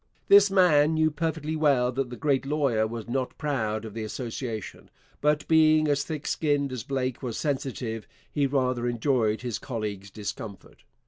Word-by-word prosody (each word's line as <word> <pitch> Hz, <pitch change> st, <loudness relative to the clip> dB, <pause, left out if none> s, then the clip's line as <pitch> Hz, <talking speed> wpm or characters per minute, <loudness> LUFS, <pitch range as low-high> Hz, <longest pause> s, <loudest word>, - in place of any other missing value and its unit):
This 200 Hz, 0 st, +8 dB
man 160 Hz, -5 st, +4 dB
knew 155 Hz, 0 st, +3 dB
perfectly 160 Hz, 0 st, -2 dB
well 140 Hz, -5 st, +3 dB
that 130 Hz, 0 st, -2 dB
the 120 Hz, -, -6 dB
great 140 Hz, 0 st, +1 dB
lawyer 135 Hz, -6 st, +1 dB
was 115 Hz, 0 st, -6 dB
not 130 Hz, +1 st, -2 dB
proud 115 Hz, -8 st, -2 dB
of 110 Hz, -, -8 dB
the 115 Hz, -, -5 dB
association, 115 Hz, -1 st, -5 dB, 0.3 s
but 150 Hz, +1 st, +1 dB
being 155 Hz, -1 st, +5 dB
as 145 Hz, -1 st, +1 dB
thick 155 Hz, -1 st, -5 dB
skinned 145 Hz, -3 st, 0 dB
as 125 Hz, -2 st, -4 dB
Blake 130 Hz, -1 st, -2 dB
was 120 Hz, -4 st, -4 dB
sensitive, 130 Hz, -6 st, -3 dB, 0.2 s
he 145 Hz, -2 st, +1 dB
rather 130 Hz, -3 st, 0 dB
enjoyed 120 Hz, -2 st, +1 dB
his 120 Hz, -3 st, -3 dB
colleague's 105 Hz, -5 st, -5 dB
discomfort. 105 Hz, 0 st, -8 dB
135 Hz, 165 wpm, -27 LUFS, 115-150 Hz, 0.3 s, This